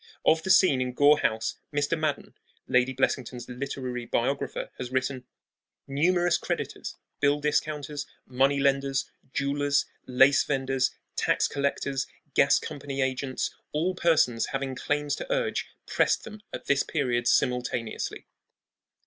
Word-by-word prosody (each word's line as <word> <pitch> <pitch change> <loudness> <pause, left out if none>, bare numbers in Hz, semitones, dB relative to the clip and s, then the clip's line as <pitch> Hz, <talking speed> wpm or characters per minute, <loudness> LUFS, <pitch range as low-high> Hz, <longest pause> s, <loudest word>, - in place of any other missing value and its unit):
Of 160 0 +4
the 190 - -5
scene 185 -8 +5
in 125 0 -2
Gore 145 +3 +5
House 110 0 -1
Mr. 145 +2 +1
Madden, 155 -3 -2 0.3
Lady 125 +1 +3
Blessington's 125 -2 -1
literary 125 -1 -4
biographer, 130 +5 -1
has 125 - -4
written: 130 0 -1 0.6
Numerous 175 +5 +2
creditors, - - -4 0.2
bill 145 0 +3
discounters, 150 -1 -1 0.2
money 135 +2 +2
lenders, 135 0 +1 0.2
jewelers, 140 +1 +1 0.2
lace 135 +2 +5
venders, 135 -2 0 0.3
tax - - +2
collectors, 140 -1 -1 0.3
gas - - +5
company 140 -1 -3
agents, 130 0 -2 0.2
all 165 +5 +1
persons 155 -10 +2
having 135 -1 -3
claims 145 +2 -1
to - - -6
urge - - 0 0.2
pressed - - +2
them 215 -1 -10
at - - -7
this 140 0 +3
period 120 -5 0
simultaneously. 125 -3 0
140 Hz, 125 wpm, -27 LUFS, 130-145 Hz, 0.6 s, scene